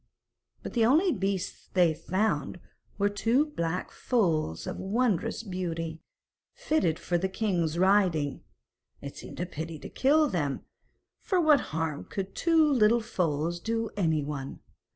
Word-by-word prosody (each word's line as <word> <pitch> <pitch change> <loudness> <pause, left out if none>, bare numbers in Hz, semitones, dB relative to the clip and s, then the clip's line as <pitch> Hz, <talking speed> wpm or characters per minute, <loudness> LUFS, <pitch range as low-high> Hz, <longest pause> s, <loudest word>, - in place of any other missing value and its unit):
But - - -6
the 235 - +2
only 315 - +4
beasts 195 - -3
they 175 -3 +5
found 185 -1 -1 0.4
were 200 - +2
two 225 +8 +2
black 180 - -3
foals 160 - 0
of - - -4
wondrous 215 +1 0
beauty, 165 -5 -4 0.5
fitted 310 - +1
for 175 -1 -1
the 190 +2 -1
king's 180 -6 -1
riding; 180 -7 +2 0.6
it - - -8
seemed - - -10
a 175 - -1
pity 160 -1 -6
to - - -9
kill 300 +3 +3
them, 145 - -2 0.6
for 375 -3 0
what 310 -4 +5
harm 160 -2 -3
could 195 -1 -5
two 330 -2 +3
little 235 -5 +4
foals 170 -4 -1
do 225 +4 -2
anyone? 150 -7 -2
185 Hz, 135 wpm, -28 LUFS, 165-230 Hz, 0.6 s, they